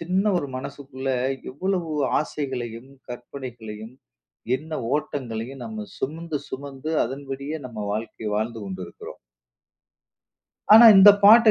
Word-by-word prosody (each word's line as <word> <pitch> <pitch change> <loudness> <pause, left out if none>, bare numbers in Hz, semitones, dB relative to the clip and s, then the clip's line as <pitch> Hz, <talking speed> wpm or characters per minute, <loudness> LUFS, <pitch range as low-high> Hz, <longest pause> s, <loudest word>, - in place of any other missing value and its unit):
சின்ன 185 +4 0
ஒரு 145 - -3
மனசுக்குள்ள 135 0 -6 0.4
எவ்வளவு 175 +3 -2 0.3
ஆசைகளையும், 130 -4 -5 0.2
கற்பனைகளையும், 120 -3 -8 0.6
எண்ண 160 +3 -11 0.2
ஓட்டங்களையும் 130 -4 -4
நம்ம 110 -2 -6
சுமந்து, 160 +2 -3
சுமந்து 140 +3 -6
அதன்படியே 140 +3 -6
நம்ம 110 -4 -6
வாழ்க்கைய 110 0 -4
வாழ்ந்து 115 +1 -3
கொண்டிருக்கிறோம். 95 -3 -8 1.5
ஆனா, 225 +2 +10
இந்த 195 +2 +10
பாட்டை 225 +2 +9
135 Hz, 100 wpm, -24 LUFS, 115-155 Hz, 1.5 s, ஆனா